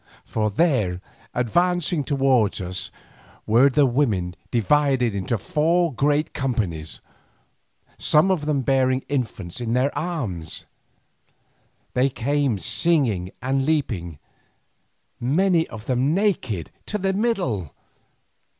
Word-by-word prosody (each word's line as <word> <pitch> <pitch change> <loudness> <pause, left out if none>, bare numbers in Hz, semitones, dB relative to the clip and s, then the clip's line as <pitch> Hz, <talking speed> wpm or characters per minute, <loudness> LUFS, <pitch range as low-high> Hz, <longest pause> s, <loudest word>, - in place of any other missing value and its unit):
For 110 -1 -1
there, 105 - +1 0.3
advancing 175 +5 +1
towards 135 -7 +2
us, 90 0 -4 0.6
were 120 +6 +5
the 140 +2 +4
women 110 -10 0
divided 130 -1 +2
into 100 +4 -1
four 165 - +1
great 145 +4 +1
companies, 100 - -2 1.0
some 155 +6 +4
of 155 -5 -1
them 145 -3 +1
bearing 130 0 +2
infants 120 -6 -3
in 115 -1 -1
their 130 +3 +1
arms. 115 - -3 1.3
They 130 +2 +3
came 135 -1 0
singing 110 - +1
and 135 +1 +1
leaping, 115 - -1 1.0
many 165 +6 +2
of 110 -2 -10
them 130 +5 +1
naked 155 - -1 0.2
to 210 - -1
the 195 -1 0
middle. 190 - -1
130 Hz, 105 wpm, -23 LUFS, 110-150 Hz, 1.3 s, were